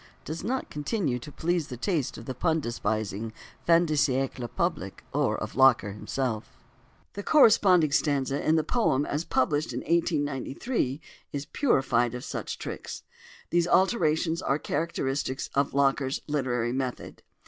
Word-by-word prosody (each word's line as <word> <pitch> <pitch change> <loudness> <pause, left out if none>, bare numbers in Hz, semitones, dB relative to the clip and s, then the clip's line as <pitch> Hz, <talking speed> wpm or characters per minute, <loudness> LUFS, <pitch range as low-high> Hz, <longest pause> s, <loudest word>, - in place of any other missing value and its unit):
does 155 +2 -5
not 260 +3 -2
continue 150 - -1
to 145 +5 -10
please 170 0 -1
the 125 - -7
taste 155 - -1
of 115 - -9
the 130 - -4
pun 160 +5 +1
despising 110 -3 -2 0.4
fin 170 +1 +6
de 155 - -1
siècle 135 -4 0
public - - -2
or - - +1
of - - -6
Locker 130 -6 +5
himself: 110 +2 -4 0.6
the 205 - -5
corresponding 195 - +5
stanza 140 -2 +1
in 155 - +3
the 160 - +2
poem 145 - +1
as 150 +3 -2
published 150 0 0
in - - -3
1893 145 - -1 0.3
is 140 0 -4
purified 130 - +1
of 125 - -6
such - - -5
tricks. - - -6 0.5
These 175 0 +3
alterations 170 -4 +2
are 135 - +1
characteristic 140 -5 -2
of 140 0 0
Locker's 135 -1 +2
literary 125 -5 0
method. 130 -1 -4
145 Hz, 145 wpm, -27 LUFS, 130-165 Hz, 0.6 s, fin